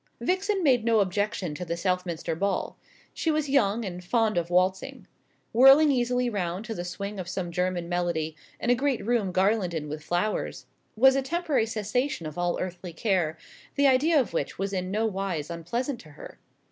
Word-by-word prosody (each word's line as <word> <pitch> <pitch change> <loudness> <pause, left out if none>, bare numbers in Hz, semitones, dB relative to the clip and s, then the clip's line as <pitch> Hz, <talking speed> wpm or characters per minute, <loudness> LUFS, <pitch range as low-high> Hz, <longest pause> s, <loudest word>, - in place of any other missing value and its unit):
Vixen 380 +1 0
made 255 -6 +4
no 225 -1 +3
objection 200 -3 -1
to 165 - -5
the 170 -1 -3
Southminster 180 -3 -2
ball. 200 +4 -1 0.4
She 325 - -1
was 305 -2 0
young, 230 -4 +2
and 180 -1 -6
fond 225 +3 +1
of 170 -1 -1
waltzing. 185 +2 0 0.5
Whirling 270 +5 +7
easily 250 -1 +1
round 190 -2 -3
to 230 - -4
the 175 - -4
swing 200 +3 -5
of 180 -1 -5
some 180 -2 -3
German 180 0 -1
melody, 170 -3 -1 0.2
in 240 - +1
a - - +5
great 265 -3 -1
room 225 -5 +1
garlanded 185 -5 +1
with 150 +1 -6
flowers, 175 +6 -2 0.3
was 265 +4 +6
a 275 - +2
temporary 290 -4 0
cessation 220 - -2
of 155 -1 -6
all 175 0 -1
earthly 180 -1 -5
care, 170 -4 0 0.4
the 280 - +3
idea 285 +4 +4
of 250 - -1
which 145 - -2
was 195 +1 -3
in 185 -1 -2
no 215 +3 0
wise 190 -7 -3
unpleasant 235 - -3
to 155 - -14
her. 145 - -12
195 Hz, 185 wpm, -27 LUFS, 175-245 Hz, 0.5 s, Whirling